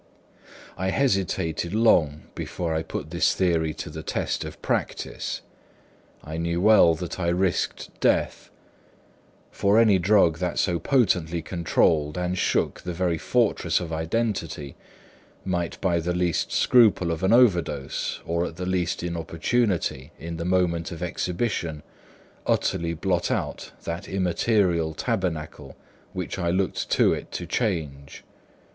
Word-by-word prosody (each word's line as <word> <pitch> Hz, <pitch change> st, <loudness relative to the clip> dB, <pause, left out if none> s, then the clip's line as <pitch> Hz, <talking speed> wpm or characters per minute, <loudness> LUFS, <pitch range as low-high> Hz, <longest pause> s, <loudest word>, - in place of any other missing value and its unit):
I 95 Hz, 0 st, 0 dB
hesitated 95 Hz, -, 0 dB
long 80 Hz, -10 st, +3 dB
before 85 Hz, -2 st, -3 dB
I 80 Hz, -, 0 dB
put 80 Hz, -1 st, -6 dB
this 85 Hz, -, +2 dB
theory 85 Hz, -4 st, +1 dB
to -, -, -6 dB
the 80 Hz, +1 st, -6 dB
test -, -, -2 dB
of -, -, -8 dB
practice. -, -, -2 dB, 0.8 s
I 80 Hz, +1 st, -6 dB
knew 85 Hz, +1 st, -1 dB
well 95 Hz, -4 st, +6 dB
that 90 Hz, +2 st, -6 dB
I 85 Hz, -, -1 dB
risked 90 Hz, +1 st, 0 dB
death; -, -, +1 dB, 1.0 s
for 100 Hz, +2 st, +2 dB
any 110 Hz, -4 st, +5 dB
drug 85 Hz, -3 st, +3 dB
that 90 Hz, -2 st, -2 dB
so 85 Hz, -3 st, +1 dB
potently 90 Hz, -, +1 dB
controlled 80 Hz, -3 st, +1 dB
and 90 Hz, 0 st, -1 dB
shook 90 Hz, -, 0 dB
the 90 Hz, -1 st, -5 dB
very 85 Hz, -2 st, 0 dB
fortress -, -, +1 dB
of 85 Hz, -2 st, -5 dB
identity, 80 Hz, -4 st, -2 dB, 0.7 s
might, 90 Hz, -2 st, -2 dB
by 85 Hz, -3 st, +2 dB
the 90 Hz, +1 st, -2 dB
least 90 Hz, -2 st, 0 dB
scruple 105 Hz, -8 st, +4 dB
of 80 Hz, -, -3 dB
an 95 Hz, +2 st, +2 dB
overdose 90 Hz, -, +2 dB
or 85 Hz, +1 st, 0 dB
at -, -, -9 dB
the 90 Hz, +1 st, -5 dB
least 90 Hz, -2 st, -1 dB
inopportunity 85 Hz, -, -1 dB
in 85 Hz, 0 st, -6 dB
the 85 Hz, -, -4 dB
moment 90 Hz, -2 st, +1 dB
of 85 Hz, 0 st, -6 dB
exhibition, 85 Hz, -3 st, -2 dB, 0.6 s
utterly 85 Hz, 0 st, 0 dB
blot 90 Hz, +1 st, 0 dB
out -, -, -3 dB
that 85 Hz, +1 st, -5 dB
immaterial 90 Hz, -3 st, +1 dB
tabernacle 80 Hz, -5 st, -3 dB, 0.4 s
which 90 Hz, 0 st, -4 dB
I 85 Hz, -2 st, 0 dB
looked 95 Hz, +2 st, -1 dB
to -, -, +4 dB
it -, -, -6 dB
to 90 Hz, -, -4 dB
change. 80 Hz, -, -3 dB
85 Hz, 135 wpm, -25 LUFS, 80-95 Hz, 1.0 s, well